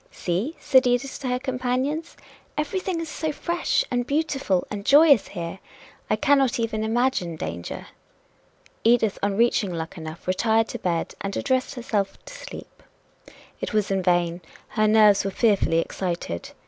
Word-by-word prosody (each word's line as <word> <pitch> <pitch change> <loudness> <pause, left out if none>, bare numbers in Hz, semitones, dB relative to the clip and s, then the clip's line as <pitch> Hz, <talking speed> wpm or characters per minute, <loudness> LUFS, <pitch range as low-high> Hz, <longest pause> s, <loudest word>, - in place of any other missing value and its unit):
"See," 195 - -2
said 260 -1 +4
Edith 245 +2 0
to 275 - -4
her 250 0 +1
companions, 260 +4 -2 0.4
"everything 350 +4 -2
is 330 - -4
so 310 0 -3
fresh 340 +3 0
and 245 -1 0
beautiful 280 - 0
and 205 -1 -4
joyous 285 -1 +6
here! 170 0 -6 0.5
I - - +3
cannot 275 -3 +2
even 220 -1 -1
imagine 225 -7 0
danger." 85 - -6 1.0
Edith 225 -3 +3
on 200 0 0
reaching 230 -4 +2
Luckenough 160 -1 -6
retired 220 +4 +2
to - - -5
bed, 170 -2 -1
and 195 0 -3
addressed 260 -1 0
herself 210 -5 -2
to - - -10
sleep. - - -10 0.8
It - - -4
was 210 -2 +1
in 195 -1 +1
vain 175 -1 +1 0.3
her 215 -1 +2
nerves 210 -2 +5
were 195 - -1
fearfully 200 -5 +2
excited. 170 - -3
225 Hz, 150 wpm, -24 LUFS, 190-270 Hz, 1.0 s, joyous